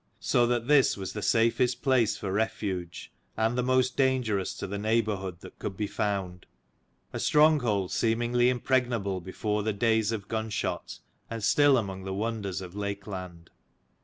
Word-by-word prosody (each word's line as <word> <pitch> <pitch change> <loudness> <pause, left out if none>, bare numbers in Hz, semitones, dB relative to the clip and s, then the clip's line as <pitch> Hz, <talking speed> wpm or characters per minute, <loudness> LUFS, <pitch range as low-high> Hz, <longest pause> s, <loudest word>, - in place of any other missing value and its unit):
So 120 -1 +2
that 120 -1 0
this 145 -6 +4
was 95 -2 -5
the 105 - -4
safest 115 +3 +2
place 130 -5 +2
for 95 - -4
refuge, 95 -4 -3 0.3
and 110 +2 +1
the 125 - +1
most 130 0 +2
dangerous 125 -8 +1
to - - -5
the 100 +1 -4
neigh 110 +2 +2
bourhood 95 -4 -4
that - - -13
could 95 - -5
be 105 - -1
found: 95 -4 -3 0.7
a - - -3
stronghold 130 - +3
136 - - -1
seemingly 120 +2 +2
impregnable 120 -6 0
before 105 +4 -2
the 110 +1 -1
days 110 0 +2
of 105 -3 -4
gunshot, 110 -1 -3 0.3
and 115 -2 -5
still 145 +3 +5
among 95 -4 -3
the 95 0 -3
wonders 105 -3 -3
of 90 -1 -9
Lakeland. 95 -4 -6
110 Hz, 160 wpm, -28 LUFS, 100-120 Hz, 0.7 s, still